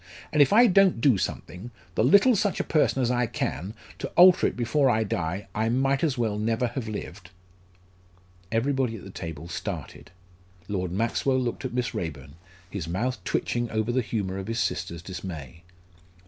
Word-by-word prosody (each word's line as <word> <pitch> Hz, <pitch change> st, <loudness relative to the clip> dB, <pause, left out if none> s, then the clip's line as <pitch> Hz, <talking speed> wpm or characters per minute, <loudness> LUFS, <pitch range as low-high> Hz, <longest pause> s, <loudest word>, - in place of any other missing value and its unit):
"And 150 Hz, -, +4 dB
if 145 Hz, -, +5 dB
I 230 Hz, +4 st, +7 dB
don't 195 Hz, -, +4 dB
do 120 Hz, -5 st, +4 dB
something 95 Hz, +6 st, -5 dB, 0.2 s
the 110 Hz, -, +1 dB
little 200 Hz, -, +6 dB
such 205 Hz, -1 st, 0 dB
a -, -, +1 dB
person 150 Hz, -4 st, +2 dB
as 120 Hz, -, +1 dB
I 125 Hz, -1 st, +1 dB
can 90 Hz, -, -3 dB, 0.2 s
to -, -, -3 dB
alter 180 Hz, 0 st, +7 dB
it -, -, -4 dB
before 130 Hz, +3 st, +2 dB
I 110 Hz, -2 st, +2 dB
die, 90 Hz, -1 st, -3 dB
I 110 Hz, +1 st, 0 dB
might 135 Hz, +4 st, +1 dB
as 145 Hz, -6 st, +1 dB
well 110 Hz, -3 st, -1 dB
never 115 Hz, +3 st, 0 dB
have 120 Hz, -1 st, -5 dB
lived." 100 Hz, -3 st, -7 dB, 1.2 s
Everybody 125 Hz, +1 st, 0 dB
at 95 Hz, -1 st, -11 dB
table 80 Hz, -2 st, -7 dB
started. 85 Hz, -2 st, -6 dB, 0.6 s
Lord 90 Hz, -3 st, -2 dB
Maxwell 115 Hz, +6 st, 0 dB
looked 125 Hz, +1 st, -3 dB
at 130 Hz, -, -4 dB
Miss 125 Hz, -2 st, -1 dB
Raeburn, 70 Hz, -5 st, -5 dB, 0.3 s
his 90 Hz, -3 st, -5 dB
mouth 115 Hz, +10 st, -2 dB
twitching 120 Hz, -1 st, -1 dB
over 110 Hz, +1 st, -1 dB
the 130 Hz, +1 st, +1 dB
humour 100 Hz, -5 st, -3 dB
of 95 Hz, -, -6 dB
his 115 Hz, 0 st, -3 dB
sister's 85 Hz, -6 st, -2 dB
dismay. 85 Hz, -5 st, -7 dB
115 Hz, 175 wpm, -26 LUFS, 95-130 Hz, 1.2 s, I